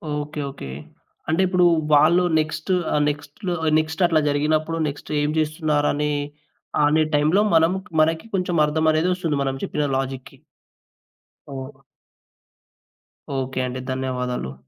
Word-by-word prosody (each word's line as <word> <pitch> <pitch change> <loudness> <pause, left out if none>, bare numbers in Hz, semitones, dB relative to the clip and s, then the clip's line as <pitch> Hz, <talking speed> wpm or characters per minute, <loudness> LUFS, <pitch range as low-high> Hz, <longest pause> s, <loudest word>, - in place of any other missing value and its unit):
Okay. 150 0 -4
Okay. 135 - -9 0.6
అంటే 165 +4 +2
ఇప్పుడు 180 -1 +3 0.3
వాళ్ళు 170 +5 +5 0.2
నెక్స్టు 155 +3 -2 0.2
ఆహ్, 150 - +2
నెక్స్ట్‌లో 150 +6 -5 0.3
నెక్స్ట్ 160 +3 -2
అట్లా 165 -2 +3
జరిగినప్పుడు 155 +3 0
నెక్స్ట్ 145 0 -7
ఏం 145 - 0
చేస్తున్నారనే 150 -1 0 0.7
అనే 155 +2 +3
టైంలో 155 +7 +3
మనం 165 +2 +5 0.3
మనకి 160 +3 +1
కొంచెం 180 -2 -1
అర్థమనేదొస్తుంది 160 +1 +1
మనం 135 -1 -1
చెప్పిన 150 - -1
లాజిక్‌కి. 135 -1 -5 1.2
ఓహ్! 135 +1 -8 1.6
ఓకే 130 0 -3
అండి. 125 +1 -5
ధన్యవాదాలు. 125 - -3
150 Hz, 110 wpm, -22 LUFS, 145-160 Hz, 1.6 s, వాళ్ళు